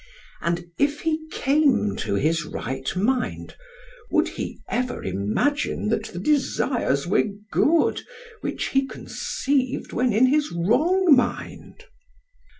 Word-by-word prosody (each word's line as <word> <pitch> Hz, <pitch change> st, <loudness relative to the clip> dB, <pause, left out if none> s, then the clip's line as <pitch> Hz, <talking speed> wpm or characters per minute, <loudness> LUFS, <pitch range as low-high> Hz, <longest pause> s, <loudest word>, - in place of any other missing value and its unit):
And 170 Hz, +1 st, -1 dB
if 290 Hz, +1 st, +1 dB
he 315 Hz, -1 st, -1 dB
came 275 Hz, -, +2 dB
to 100 Hz, -, -2 dB
his 160 Hz, +8 st, +1 dB
right 130 Hz, -3 st, -4 dB
mind, 245 Hz, +7 st, -1 dB, 0.5 s
would -, -, +2 dB
he -, -, -6 dB
ever 250 Hz, +1 st, -2 dB
imagine 105 Hz, -, -1 dB
that 220 Hz, -1 st, 0 dB
the 175 Hz, -, -8 dB
desires 245 Hz, -, +1 dB
were 185 Hz, +4 st, +2 dB, 0.3 s
good 325 Hz, +2 st, +3 dB, 0.4 s
which -, -, -3 dB
he 270 Hz, 0 st, +1 dB
conceived 265 Hz, -1 st, -2 dB
when 250 Hz, +1 st, +2 dB
in 225 Hz, +5 st, +4 dB
his 295 Hz, +3 st, +2 dB
wrong 295 Hz, -, +4 dB
mind? 250 Hz, -2 st, -3 dB
250 Hz, 120 wpm, -24 LUFS, 170-290 Hz, 0.5 s, in